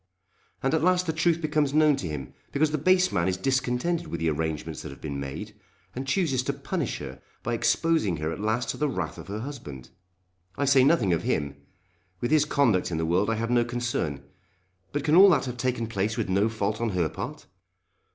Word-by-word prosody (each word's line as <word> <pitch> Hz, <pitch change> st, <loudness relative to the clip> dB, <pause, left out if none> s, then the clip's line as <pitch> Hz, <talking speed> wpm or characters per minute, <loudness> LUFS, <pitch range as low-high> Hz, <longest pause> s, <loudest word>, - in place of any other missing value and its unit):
And 135 Hz, -, +1 dB
at 160 Hz, -, +2 dB
last 180 Hz, 0 st, +3 dB
the 160 Hz, -, -1 dB
truth 165 Hz, +1 st, +1 dB
becomes 150 Hz, -2 st, +1 dB
known 155 Hz, -1 st, +5 dB
to 90 Hz, -, -4 dB
him 70 Hz, -5 st, -6 dB, 0.2 s
because 150 Hz, +2 st, +2 dB
the 155 Hz, -, -1 dB
base 185 Hz, +4 st, +4 dB
man 85 Hz, -2 st, +1 dB
is 95 Hz, -1 st, 0 dB
discontented 135 Hz, -, 0 dB
with 85 Hz, -, -4 dB
the 80 Hz, -1 st, +1 dB
arrangements 80 Hz, 0 st, -3 dB
that 80 Hz, -, -7 dB
have 70 Hz, -, -11 dB
been 70 Hz, -3 st, -5 dB
made, 70 Hz, -1 st, -6 dB, 0.4 s
and 130 Hz, +2 st, -4 dB
chooses 135 Hz, -3 st, +1 dB
to 140 Hz, +2 st, -2 dB
punish 140 Hz, -, -3 dB
her 65 Hz, -2 st, -8 dB, 0.2 s
by 120 Hz, -, -1 dB
exposing 120 Hz, -, +1 dB
her 80 Hz, +1 st, -2 dB
at -, -, -6 dB
last 110 Hz, +3 st, -1 dB
to -, -, -2 dB
the 150 Hz, -1 st, 0 dB
wrath 90 Hz, -, -4 dB
of -, -, -10 dB
her 105 Hz, +2 st, -4 dB
husband! 75 Hz, -, -8 dB, 0.7 s
I 145 Hz, -, +1 dB
say 135 Hz, -1 st, +5 dB
nothing 125 Hz, -, +3 dB
of 85 Hz, -, 0 dB
him. 70 Hz, -1 st, -1 dB, 0.6 s
With 120 Hz, -, -2 dB
his 155 Hz, -1 st, +5 dB
conduct 120 Hz, -11 st, +2 dB
in 85 Hz, -, -2 dB
the 80 Hz, -, 0 dB
world 90 Hz, +6 st, +1 dB
I 115 Hz, -, +1 dB
have 115 Hz, +2 st, -2 dB
no 120 Hz, -1 st, +4 dB
concern. 120 Hz, -, -2 dB, 0.7 s
But 145 Hz, 0 st, -2 dB
can 150 Hz, 0 st, +1 dB
all 195 Hz, +4 st, +9 dB
that 150 Hz, -7 st, +3 dB
have 125 Hz, -1 st, -5 dB
taken 125 Hz, -2 st, -1 dB
place 110 Hz, 0 st, -2 dB
with -, -, -1 dB
no 100 Hz, +4 st, +2 dB
fault 110 Hz, 0 st, -2 dB
on 115 Hz, -, +1 dB
her 85 Hz, -3 st, +2 dB
part? -, -, -7 dB
120 Hz, 220 wpm, -26 LUFS, 90-150 Hz, 0.7 s, all